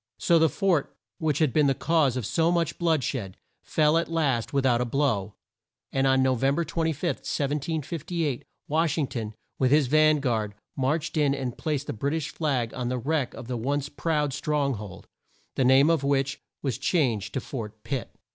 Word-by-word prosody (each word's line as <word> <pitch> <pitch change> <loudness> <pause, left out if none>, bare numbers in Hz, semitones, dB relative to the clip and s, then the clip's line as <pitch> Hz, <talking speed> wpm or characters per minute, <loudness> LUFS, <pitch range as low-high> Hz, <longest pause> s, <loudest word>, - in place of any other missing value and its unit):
So 170 -1 +3
the 160 0 +4
fort 180 -6 0 0.2
which 155 -3 0
had 150 -6 +2
been 150 -2 +4
the 135 - +2
cause 155 -6 +2
of 125 - -3
so 165 - +2
much 170 -3 0
blood 165 -5 +2
shed, 100 -10 -4 0.2
fell 155 +1 +2
at 170 - -2
last 140 -8 0
with 140 -1 +1
out 120 -2 +3
a - - +1
blow, 115 -6 0 0.6
and 135 0 +1
on 130 0 +4
No 130 0 +3
vem 135 +3 +1
ber 170 - +1
25, 165 0 -1
1758, 150 0 -2 0.2
Wash 160 0 +1
ing 155 - +2
ton, 110 -4 -5 0.2
with 130 - +3
his 150 +1 +4
van 155 +3 +4
guard, 110 -6 -1 0.2
marched 150 +4 -1
in 145 -2 +3
and 130 -3 -4
placed 150 -3 -2
the - - -4
Brit 140 +8 -1
ish 155 -1 -3
flag 130 -8 -1
on 125 -1 -3
the 125 - -1
wreck 140 +1 -1
of 115 - -9
the 125 -1 -2
once 140 +4 -1
proud 150 -4 -1
strong 145 -1 0
hold, 105 -4 -8 0.5
the 135 - +1
name 135 +5 +6
of 160 -4 +1
which 140 0 0 0.2
was 135 -3 -2
changed 130 - 0
to - - +1
Fort 110 -5 -7
Pitt. 135 -4 -3
140 Hz, 195 wpm, -26 LUFS, 130-155 Hz, 0.6 s, name